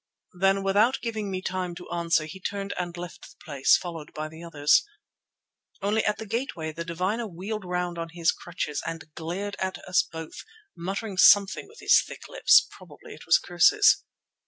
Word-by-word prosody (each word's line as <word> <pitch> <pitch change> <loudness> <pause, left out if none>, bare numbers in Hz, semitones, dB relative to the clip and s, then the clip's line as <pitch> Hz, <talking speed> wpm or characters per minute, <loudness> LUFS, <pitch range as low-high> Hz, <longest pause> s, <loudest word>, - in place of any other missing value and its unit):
Then, 195 +2 +2
without 210 +7 +3
giving 220 -3 -3
me 185 -1 -4
time 185 -2 -3
to 180 - -10
answer, 170 -2 +1
he 180 +5 -9
turned 200 +1 -4
and 175 -1 -4
left 175 0 -8
the - - -15
place, 140 -3 +3
followed 165 -4 -7
by 155 0 -4
the 160 +1 -12
others. 150 -3 +3 1.0
Only 210 +2 +1
at 210 - 0
the 220 - -7
gateway 215 - -3
the 165 +2 -6
diviner 185 +7 -2
wheeled 200 +4 -5
round 180 -1 -2
on 165 0 -4
his 165 0 +1
crutches 160 -4 -4
and 165 -2 -7
glared 185 +6 -4
at 190 0 -2
us 185 0 +3
both, 160 -1 -9 0.3
muttering 195 +3 -4
something 200 +1 +5
with 450 +3 -16
his - - +6
thick - - -10
lips; - - +5
probably - - -13
it - - -14
was - - +6
curses. - - +4
180 Hz, 180 wpm, -26 LUFS, 165-200 Hz, 1.0 s, his